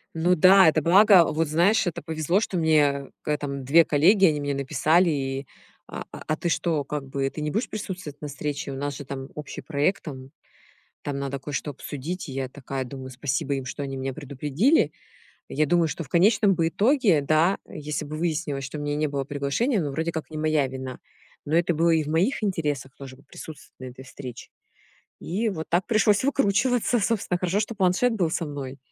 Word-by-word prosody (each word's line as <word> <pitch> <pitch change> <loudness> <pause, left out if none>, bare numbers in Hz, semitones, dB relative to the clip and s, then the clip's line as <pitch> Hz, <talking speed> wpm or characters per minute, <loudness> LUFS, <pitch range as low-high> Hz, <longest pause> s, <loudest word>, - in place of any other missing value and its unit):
Ну 175 +3 +3
да, 185 +2 +7
это 155 0 +1
благо, 190 +2 +6
вот 160 0 0
знаешь, 175 +9 +3
это 170 -1 -3
повезло, 160 +5 0
что 195 -4 -2
мне 145 -4 +2
когда-то 150 -1 -2
там 140 -1 -5
2 165 +5 +6
коллеги, 185 +7 +4
они 150 -4 +3
мне 145 0 -2
написали 155 +5 +2
и: 135 -2 -2 0.4
"А - - -6
а - - -9
а 155 - +1
ты 170 - -2
что, 165 -3 0
как 140 0 -5
бы, 135 0 -1
ты 155 - -7
не 150 0 -2
будешь 220 +5 -1
присутствовать 185 -8 -6
на 150 - -4
встрече? 145 -1 -4
У - - -5
нас 145 +1 -3
же 145 - -8
там 135 0 -6
общий 150 -1 -7
проект, 150 +5 -1
там 130 -4 -8 0.7
там 140 -1 -3
надо 140 0 -3
кое-что 145 +2 -4
обсудить". 145 +5 -6
И 135 - -6
я 130 -1 -3
такая 135 -1 -5
думаю, 130 +1 -8
спасибо 140 +3 -2
им, 135 -1 -4
что 140 +3 -5
они 135 -1 -5
меня 135 0 -3
предупредили. 150 - +1 0.6
Я 155 +2 +1
думаю, 170 +2 +2
что 165 - -4
в 140 - -15
конечном 200 +2 +4
бы 165 -1 +1
итоге 210 - +3
да, 155 +6 +2
если 150 0 -5
бы 150 +1 -6
выяснилось, 155 -4 -2
что 135 +3 -6
у 145 - -5
меня 145 0 -2
не 155 +1 0
было 140 -1 -2
приглашения, 145 - -1
но 145 - -2
вроде 160 +4 -2
как 160 -1 -5
не 155 - -7
моя 155 -2 +1
вина. 130 -1 -7 0.5
Но 150 - 0
это 175 0 +2
было 165 +2 +2
и 160 -1 +3
в - - -9
моих 175 - +1
интересах 150 -9 -2
тоже 135 -2 -10
вот 140 +1 -23
присутствовать 155 +1 -11
на 130 - -8
этой 130 +2 -13
встрече. 130 -2 -9 0.7
И 215 +6 -1
вот 160 -5 -6
так 175 +2 +1
пришлось 215 -1 +3
выкручиваться. 245 -2 +2
Собственно, 200 -4 0
хорошо, 180 +3 0
что 220 +2 -3
планшет 195 +5 +2
был 175 -7 0
со 170 - -1
мной. 140 -2 -6
155 Hz, 205 wpm, -25 LUFS, 140-180 Hz, 0.7 s, да